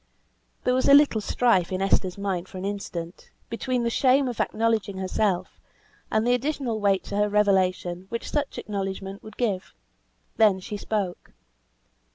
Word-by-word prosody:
There 250 - +2
was 260 +2 +2
a 280 - +9
little 285 -7 +5
strife 205 -6 +2
in 185 - -1
Esther's 190 -1 +1
mind 190 -3 -2
for 185 - -10
an 185 - -5
instant, 185 -4 -5 0.2
between 245 +2 -1
the 235 - 0
shame 265 +2 +3
of 245 - -5
acknowledging 220 -3 0
herself, 190 -1 -1 0.5
and 220 +1 +1
the 245 - +3
additional 250 -3 -1
weight 200 -2 +2
to 200 - -5
her 210 0 +2
revelation 190 -3 +1
which 230 - -5
such 290 -2 -2
acknowledgment 195 -1 -4
would 215 -1 -12
give. 205 -6 -2 0.6
Then 210 -4 +5
she 200 +3 -6
spoke. 200 -3 -3
205 Hz, 160 wpm, -25 LUFS, 190-235 Hz, 0.6 s, a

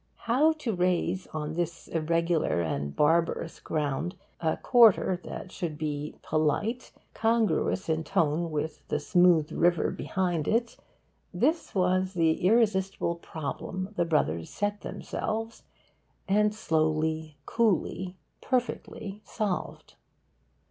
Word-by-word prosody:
How 275 +7 +4
to 295 -8 -3
raise 180 0 0
on 155 0 -4
this 170 0 -3
irregular 165 - +1
and 70 -3 -3
'barbarous' 165 +1 +1
ground 155 +4 -2 0.2
a 160 -1 0
quarter 215 -6 +5
that 185 - -7
should 165 -5 -4
be 150 -1 -3
'polite', 180 - 0 0.2
congruous 225 -4 +1
in 160 0 0
tone 160 +2 +1
with 155 0 -3
the 150 - 0
smooth 170 0 +4
river 175 -1 +2
beyond 175 -5 -1
it 230 +1 +1 0.6
this 320 -5 0
was 185 0 +1
the 165 -2 +2
irresistible 195 -4 +2
problem 170 +4 -5
the - - +2
Brothers 85 - 0
set 205 0 -2
themselves 225 +1 -4 0.6
and 210 +2 +3
slowly, 155 -3 0
coolly, 190 -4 0 0.3
perfectly 225 -5 -2
solved. 205 -5 -4
175 Hz, 110 wpm, -28 LUFS, 155-205 Hz, 0.6 s, quarter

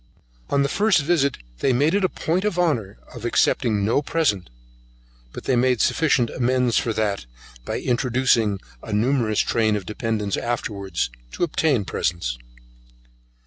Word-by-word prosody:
On 140 0 +2
the - - +1
first 205 +3 +3
visit 140 -4 +1 0.2
they 130 - +2
make 145 +7 +2
it 200 0 +2
a 185 - +3
point 175 +2 -1
of 210 -4 -1
honour 120 - 0 0.2
of 120 -3 -9
accepting 120 -1 +2
of 100 - -1
no 115 +7 +2
present; 145 - 0 0.8
but - - -8
they 130 - +1
make 125 0 +2
sufficient 135 -7 +2
amends 125 -1 +1
for 115 - +1
that, 105 - -1 0.4
by - - -2
introducing 120 -4 +1 0.2
a 110 - -6
numerous 115 -1 +2
train 110 -2 +1
of 100 -3 -4
dependents 105 -2 -2
afterwards, 100 - -2 0.2
to - - -2
obtain 150 - +1
presents. 75 -11 -2
120 Hz, 150 wpm, -23 LUFS, 105-140 Hz, 0.8 s, first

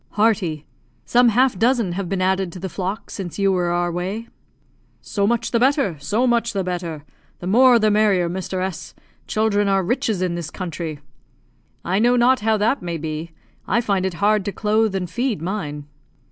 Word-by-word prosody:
"Hearty. 200 -8 +1 0.4
Some 245 0 +4
half 245 -2 +2
dozen 230 -4 +2
have 180 0 -4
been 190 -1 -1
added 190 -1 0
to 185 - -8
the 190 +1 -4
flock 195 +3 -4
since 185 -4 -6
you 195 -1 +2
were 180 -2 +1
our 175 0 0
way." 190 +7 -4 0.7
"So 200 -2 -1
much 235 0 0
the 235 - +2
better 260 - +2
so 215 - 0
much 235 -2 +1
the 195 -2 -1
better. 170 -4 -4 0.3
The - - -9
more 245 +6 +6
the 215 -2 +3
merrier, 205 -4 +3
Mr. 185 +1 -4
S; 185 -3 -6 0.3
children 210 -2 +1
are 195 -1 +2
riches 215 -2 0
in 180 -2 -1
this 170 -2 -4
country." 165 -4 -5 0.8
"I 190 +3 +1
know 240 +3 +4
not 245 +2 +4
how 220 +1 +1
that 225 +6 +1
may 170 -2 -3
be; 155 +1 -5 0.4
I - - +2
find 200 -5 0
it 190 -2 -2
hard 205 +2 +2
to 200 - -1
clothe 215 0 +1
and 185 -2 -2
feed 235 - -2
mine." 155 -5 -4
195 Hz, 190 wpm, -21 LUFS, 175-225 Hz, 0.8 s, more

